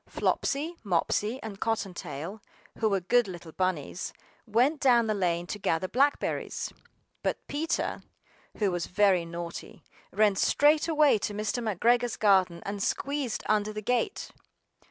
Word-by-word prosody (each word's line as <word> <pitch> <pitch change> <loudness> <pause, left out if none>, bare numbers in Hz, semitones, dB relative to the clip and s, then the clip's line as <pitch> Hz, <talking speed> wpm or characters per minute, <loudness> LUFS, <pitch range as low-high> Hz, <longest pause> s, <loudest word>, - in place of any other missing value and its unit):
FLOPSY, 310 +5 -1
Mopsy, 210 +5 0
and 205 -3 -7
Cottontail, 190 -4 -3 0.4
who 220 - +2
were 195 -2 +1
good 240 +5 +3
little 175 -3 -8
bunnies, 185 -1 -2 0.3
went 250 +8 +2
down 240 -4 +5
the 215 - +1
lane 175 -4 0
to 205 +4 -5
gather 180 -1 0
blackberries; 275 +7 0 0.5
BUT - - 0
Peter, 310 +3 -2 0.6
who 205 -3 +1
was 175 -1 -2
very 185 -2 +3
naughty, 170 0 -7 0.3
ran 210 0 +3
straight 295 - +3
away 300 -7 +4
to 205 - -3
Mr. 215 +3 -2
McGregor's 235 +3 +2
garden 185 -5 +3
and 200 0 -4
squeezed 275 +1 -1
under 215 0 +1
the 215 0 -6
gate! 250 - -1
210 Hz, 135 wpm, -28 LUFS, 185-245 Hz, 0.6 s, down